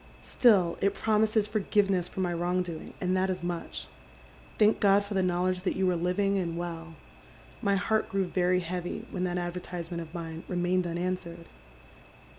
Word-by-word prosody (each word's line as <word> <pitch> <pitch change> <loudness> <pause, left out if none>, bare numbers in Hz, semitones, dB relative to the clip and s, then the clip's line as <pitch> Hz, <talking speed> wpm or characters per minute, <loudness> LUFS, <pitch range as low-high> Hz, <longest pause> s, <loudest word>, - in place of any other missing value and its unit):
Still 190 -9 +4
it 200 0 +2
promises 215 0 +2
forgiveness 200 -3 +1
for 190 - -5
my 175 -1 0
wrong 175 +2 0
doing, 170 -3 -8
and 185 0 0
that 190 +1 +1
is 185 -1 -3
much. 175 -1 -4 0.7
Thank 215 0 +4
God 200 0 +5
for 205 - -5
the 190 - +2
knowledge 180 0 +1
that 185 - -1
you 190 0 +1
are - - +1
living 195 +3 +1
and 170 -2 -2
well. 165 -1 -5 0.7
My 200 -4 +2
heart 215 +3 +1
grew 195 -1 0
very 180 0 +1
heavy 175 0 -4
when 185 -1 -1
that 180 0 -1
advertisement 175 -1 -4
of 160 -1 -9
mine 165 -1 -6
remained 180 0 +1
unanswered. 170 -1 -3
180 Hz, 170 wpm, -29 LUFS, 175-195 Hz, 0.7 s, God